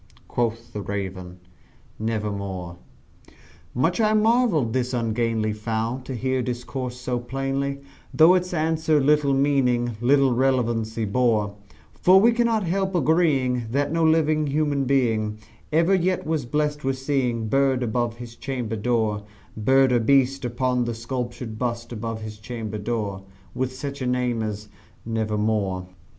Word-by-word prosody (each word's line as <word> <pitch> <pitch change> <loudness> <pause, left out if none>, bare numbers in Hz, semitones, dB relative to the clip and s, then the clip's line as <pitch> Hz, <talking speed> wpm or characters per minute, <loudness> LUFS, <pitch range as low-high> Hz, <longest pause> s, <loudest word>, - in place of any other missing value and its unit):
Quoth 115 0 -2
the 105 - -4
Raven 95 -3 -5 0.6
"Nevermore." 100 -5 -3 1.0
Much 165 - +1
I 215 0 +3
marvelled 215 - +3
this 125 0 -1
ungainly 115 -2 0
fowl 110 +3 -2
to 130 - -5
hear 130 +2 0
discourse 125 +1 -4
so 125 -1 -2
plainly, 135 +2 -3 0.3
Though 160 +3 +6
its 180 0 0
answer 160 -2 +1
little 145 0 +3
meaning 125 -4 +1
little 135 +1 +4
relevancy 115 -3 0
bore; 105 -2 +1 0.4
For 185 +1 +5
we 230 +4 +5
cannot 230 -2 +1
help 190 +2 -1
agreeing 140 -7 +2
that 140 +5 0
no 165 0 +1
living 155 -1 +3
human 145 -1 0
being 115 -5 +1 0.3
Ever 165 +5 +3
yet 185 0 +1
was 155 -5 -1
blessed 150 +2 -1
with 135 0 0
seeing 130 -5 -1
bird 135 +1 +2
above 120 0 -1
his 120 -1 -9
chamber 120 -4 -4
door 110 -2 0 0.3
Bird 130 +4 +3
or 120 - +4
beast 135 +3 +2
upon 125 0 0
the 120 -1 -3
sculptured 120 -1 -5
bust 120 -1 -3
above 115 -1 -4
his 105 -1 -8
chamber 110 -1 -5
door, 105 -3 -3 0.3
With 130 0 -2
such 140 +1 -6
name 125 -2 0
as 105 -1 -4 0.4
"Nevermore." 105 -4 -1
125 Hz, 135 wpm, -24 LUFS, 110-140 Hz, 1.0 s, Though